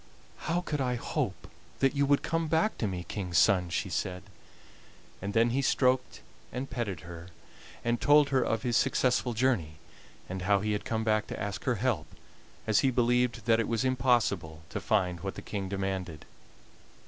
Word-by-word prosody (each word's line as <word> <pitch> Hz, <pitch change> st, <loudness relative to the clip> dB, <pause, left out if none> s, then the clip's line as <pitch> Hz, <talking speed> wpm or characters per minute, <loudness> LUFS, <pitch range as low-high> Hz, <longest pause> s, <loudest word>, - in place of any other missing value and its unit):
"How 175 Hz, +2 st, +1 dB
could 150 Hz, -5 st, -3 dB
I 125 Hz, -1 st, 0 dB
hope 120 Hz, -, -3 dB, 0.3 s
that 135 Hz, 0 st, +2 dB
you 140 Hz, 0 st, +2 dB
would 145 Hz, 0 st, +3 dB
come 165 Hz, -1 st, -1 dB
back 160 Hz, +7 st, +2 dB
to 110 Hz, -, 0 dB
me 90 Hz, -2 st, -4 dB
King's 90 Hz, -5 st, -2 dB
son?" 90 Hz, -3 st, +4 dB
she 85 Hz, -, -1 dB
said. 90 Hz, +1 st, -3 dB, 1.0 s
And 100 Hz, +3 st, -4 dB
then 115 Hz, +1 st, +4 dB
he 135 Hz, +3 st, +1 dB
stroked 130 Hz, -1 st, +1 dB, 0.3 s
and 130 Hz, +2 st, -4 dB
petted 100 Hz, -, -3 dB
her, 85 Hz, 0 st, -9 dB, 0.6 s
and 120 Hz, 0 st, 0 dB
told 145 Hz, 0 st, +5 dB
her 135 Hz, -2 st, +2 dB
of 115 Hz, -1 st, -1 dB
his 120 Hz, -2 st, 0 dB
successful 125 Hz, -1 st, +2 dB
journey, 110 Hz, -11 st, +1 dB, 0.5 s
and 95 Hz, 0 st, -5 dB
how 100 Hz, +2 st, +3 dB
he 105 Hz, +2 st, -1 dB
had 105 Hz, -, -2 dB
come 110 Hz, -1 st, -1 dB
back 110 Hz, -1 st, +1 dB
to -, -, -6 dB
ask 100 Hz, 0 st, -4 dB
her 125 Hz, -, +2 dB
help, 105 Hz, -8 st, -1 dB, 0.6 s
as 110 Hz, -2 st, +3 dB
he 135 Hz, -, +3 dB
believed 120 Hz, -2 st, +1 dB
that 115 Hz, -1 st, +4 dB
it 115 Hz, -, 0 dB
was 115 Hz, +2 st, 0 dB
impossible 120 Hz, -11 st, +1 dB
to -, -, -3 dB
find 90 Hz, -1 st, +1 dB
what 95 Hz, +2 st, -5 dB
the -, -, -7 dB
King 100 Hz, -3 st, -4 dB
demanded. 95 Hz, -5 st, -3 dB
115 Hz, 185 wpm, -29 LUFS, 95-130 Hz, 1.0 s, told